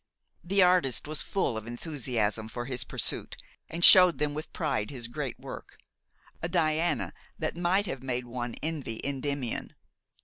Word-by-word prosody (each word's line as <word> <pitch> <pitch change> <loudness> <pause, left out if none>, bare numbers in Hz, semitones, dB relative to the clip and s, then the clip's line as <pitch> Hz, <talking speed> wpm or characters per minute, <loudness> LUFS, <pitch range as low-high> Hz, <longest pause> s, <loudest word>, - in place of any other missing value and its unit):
The 195 +2 +4
artist 180 -9 +2
was 155 0 -1
full 190 - 0
of 110 +1 -7
enthusiasm 120 -5 -2
for 120 +1 -5
his 125 -1 -2
pursuit, - - -3 0.3
and 170 +2 +4
showed 180 -2 +9
them 150 -1 0
with 155 +1 -6
pride 105 - -1
his 125 -5 -4
great 135 0 -5
work, - - -9 0.6
a 165 - -2
Diana 165 -1 +1 0.2
that 155 0 -2
might 180 +4 +2
have 135 -9 -5
made 125 -1 -2
one 120 0 -4
envy 150 -8 -3
Endymion. 140 -2 -3
145 Hz, 150 wpm, -29 LUFS, 120-170 Hz, 0.6 s, showed